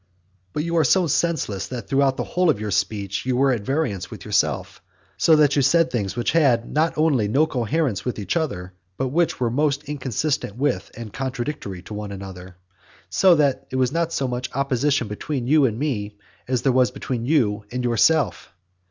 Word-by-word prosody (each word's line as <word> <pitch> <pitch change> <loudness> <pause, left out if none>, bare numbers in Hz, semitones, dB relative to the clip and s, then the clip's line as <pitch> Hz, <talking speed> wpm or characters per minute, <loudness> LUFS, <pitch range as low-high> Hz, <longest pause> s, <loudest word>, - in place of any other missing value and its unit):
VIII. 95 0 -41
But 150 - -1
you 170 +1 -1
are 160 - +4
so 180 +6 +3
senseless 150 - -1
that 125 -2 -6
throughout 135 -1 +2
the - - -1
whole 180 -1 +1
of 110 - +2
your 105 -1 -3
speech 100 0 -1
you 125 -1 0
were 135 +1 +4
at 120 -5 -1
variance 130 - -2
with - - -10
yourself; - - 0 0.3
so 160 - +4
that 150 -2 +4
you 145 - +3
said 165 +5 +3
things 100 -5 -2
which 120 - 0
had 135 -8 +3
not 160 +2 +1
only 145 -9 +2
no 140 +9 +3
coherence 125 -5 -1
with 125 - -3
each 105 - -3
other 95 - -2 0.2
but 130 -1 -1
which 165 +5 +1
were 120 -2 0
most 145 +2 +1
inconsistent 140 -4 -2
with 140 +2 -1
and 115 -3 -8
contradictory 130 -7 -4
to 105 - -9
one 105 -1 -5
another; 95 -2 -9 0.6
so 185 -2 +5
that 145 -4 +1
there 130 - -3
was 130 -1 +2
not 165 +1 0
so 135 -5 -1
much 125 0 -3
opposition 140 -1 +1
between 120 +5 -4
you 145 +2 +4
and 110 -4 -1
me 105 -8 -3 0.3
as 125 -1 -1
there 135 - +3
was 125 -1 +3
between 125 -2 -4
you 115 -9 +2
and 125 +1 -3
yourself. 125 - +2
130 Hz, 200 wpm, -23 LUFS, 105-150 Hz, 0.6 s, so